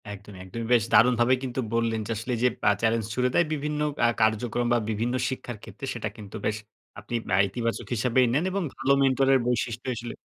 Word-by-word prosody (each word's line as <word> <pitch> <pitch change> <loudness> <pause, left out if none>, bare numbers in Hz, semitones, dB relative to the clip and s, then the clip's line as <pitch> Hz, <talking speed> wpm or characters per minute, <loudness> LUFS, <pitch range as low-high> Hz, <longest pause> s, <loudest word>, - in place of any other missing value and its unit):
একদমই, 100 -1 -10
একদমই 115 +5 -6
বেশ 120 -3 +4
দারুণভাবেই 125 +2 +5
কিন্তু 130 0 -3
বললেন 115 -1 +1
যে, - - -3
আসলে 115 +4 -4
এই - - -4
যে - - +6 0.2
আ - - +6
চ্যালেঞ্জ 115 -1 +1
ছুঁড়ে 125 +1 +1
দেয়, 175 - +4
বিভিন্ন 150 0 -2 0.3
আ - - +6
কার্যক্রম 110 +2 +1
বা - - +4
বিভিন্ন 115 +3 -1 0.2
শিক্ষার 125 -3 -6
ক্ষেত্রে, 110 +5 -8
সেটা 110 -2 -4
কিন্তু 105 -1 -10
বেশ 105 0 0 0.4
আপনি 120 - -6
বা 95 - +3
ইতিবাচক 115 +3 -3
হিসাবেই 125 +3 +3
নেন 150 +5 +2
এবং 195 0 -1
ভালো 135 +3 +2
মেন্টর 135 0 +3
এর 135 - +5
বৈশিষ্ট্যই 120 +1 -1
আসলে 120 +1 -6
120 Hz, 205 wpm, -26 LUFS, 110-125 Hz, 0.4 s, যে